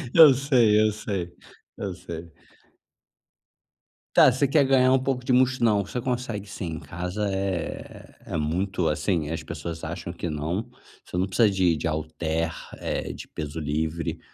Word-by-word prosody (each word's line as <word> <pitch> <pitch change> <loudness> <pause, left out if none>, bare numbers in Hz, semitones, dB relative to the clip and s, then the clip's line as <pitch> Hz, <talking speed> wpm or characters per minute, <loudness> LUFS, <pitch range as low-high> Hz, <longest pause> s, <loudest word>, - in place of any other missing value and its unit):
Eu 160 -3 +10
sei, 125 -6 +4
eu 110 0 +4
sei, 95 -5 -4 0.4
eu 100 - -3
sei. 85 -2 -8 1.8
Tá, - - +8
você 130 +3 +1
quer 140 +2 +4
ganhar 130 -1 +4
um 130 - +4
pouco 130 -1 -2
de 125 - +2
mus 130 0 +4
não, 110 -4 +3
você 100 +6 -4
consegue 120 -4 -3
sim, 85 -4 -5
em - - -6
casa 90 +6 -3
é 95 -3 -4
é - - -2
muito 90 +3 0
assim, 75 0 0
as 80 - -3
pessoas 85 +1 -6
acham 85 +1 -5
que 85 -1 -4
não, 80 +8 -3 0.3
você - - -6
não 90 - +2
precisa 105 +3 +3
de 95 -4 +2
de 80 - -2
halter, 80 +1 -2 0.2
eh, - - -3
de - - -9
peso 75 +1 -5
livre 80 +2 -2
95 Hz, 165 wpm, -25 LUFS, 80-115 Hz, 1.8 s, Eu